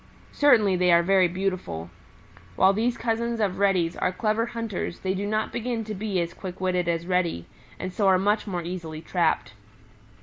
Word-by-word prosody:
Certainly 220 Hz, -10 st, +4 dB
they 180 Hz, 0 st, +3 dB
are 170 Hz, 0 st, +5 dB
very 190 Hz, 0 st, +4 dB
beautiful. 175 Hz, -, -3 dB, 0.6 s
While 190 Hz, -, +5 dB
these 235 Hz, +4 st, 0 dB
cousins 235 Hz, 0 st, -1 dB
of 195 Hz, -4 st, 0 dB
Reddy's 185 Hz, -4 st, +2 dB
are 185 Hz, -, 0 dB
clever 215 Hz, +4 st, 0 dB
hunters 230 Hz, -7 st, -4 dB
they 190 Hz, 0 st, -1 dB
do 200 Hz, +2 st, -3 dB
not 215 Hz, +1 st, -1 dB
begin 235 Hz, -1 st, -2 dB
to 215 Hz, 0 st, -5 dB
be 200 Hz, -2 st, -2 dB
as 170 Hz, 0 st, -2 dB
quick 185 Hz, -1 st, -8 dB
witted 180 Hz, -2 st, 0 dB
as 170 Hz, 0 st, -1 dB
Reddy, 175 Hz, -, 0 dB, 0.3 s
and 185 Hz, 0 st, -5 dB
so 200 Hz, +1 st, +1 dB
are 190 Hz, -1 st, +5 dB
much 205 Hz, +3 st, +1 dB
more 180 Hz, -3 st, -3 dB
easily 165 Hz, -3 st, -6 dB
trapped. 165 Hz, -, 0 dB
190 Hz, 180 wpm, -25 LUFS, 175-215 Hz, 0.6 s, are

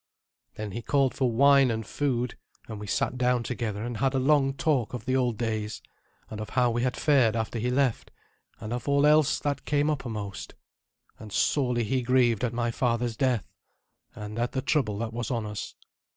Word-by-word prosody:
Then 110 Hz, -1 st, -5 dB
he 115 Hz, -, -5 dB
called 135 Hz, +1 st, +1 dB
for 130 Hz, -3 st, 0 dB
wine 140 Hz, +2 st, +5 dB
and 110 Hz, -1 st, -2 dB
food; 125 Hz, -1 st, -1 dB, 0.3 s
and 110 Hz, -2 st, -7 dB
we 105 Hz, -, -7 dB
sat 125 Hz, +6 st, -1 dB
down 125 Hz, -1 st, +2 dB
together 115 Hz, -4 st, -3 dB
and 120 Hz, -1 st, -4 dB
had 135 Hz, +3 st, +1 dB
a -, -, +2 dB
long 135 Hz, 0 st, +3 dB
talk 140 Hz, -8 st, 0 dB
of 115 Hz, -2 st, -7 dB
the 130 Hz, -, 0 dB
old 125 Hz, -4 st, +1 dB
days, 110 Hz, -2 st, -3 dB, 0.5 s
and 105 Hz, -1 st, -7 dB
of 105 Hz, -, -6 dB
how 125 Hz, -2 st, +2 dB
we 120 Hz, +1 st, -1 dB
had 125 Hz, 0 st, -1 dB
fared 130 Hz, -7 st, +3 dB
after 115 Hz, +1 st, -2 dB
he 120 Hz, +3 st, -1 dB
left, 130 Hz, -2 st, 0 dB, 0.5 s
and 110 Hz, +2 st, -5 dB
of 120 Hz, -1 st, -4 dB
all 140 Hz, 0 st, +3 dB
else 150 Hz, -1 st, +4 dB
that 145 Hz, -1 st, -2 dB
came 145 Hz, +1 st, +1 dB
uppermost. 110 Hz, -8 st, -5 dB, 0.6 s
And 110 Hz, -1 st, -10 dB
sorely 125 Hz, +1 st, +1 dB
he 130 Hz, +4 st, 0 dB
grieved 120 Hz, -3 st, +2 dB
at 120 Hz, -, 0 dB
my 120 Hz, 0 st, -1 dB
father's 120 Hz, -1 st, 0 dB
death, 125 Hz, -5 st, 0 dB, 0.7 s
and 105 Hz, +2 st, -6 dB
at 120 Hz, +1 st, -1 dB
the 130 Hz, -, -1 dB
trouble 120 Hz, -10 st, 0 dB
that 115 Hz, +1 st, -4 dB
was 120 Hz, -1 st, -3 dB
on 115 Hz, -4 st, -2 dB
us. 105 Hz, -1 st, -6 dB
120 Hz, 195 wpm, -27 LUFS, 110-135 Hz, 0.7 s, wine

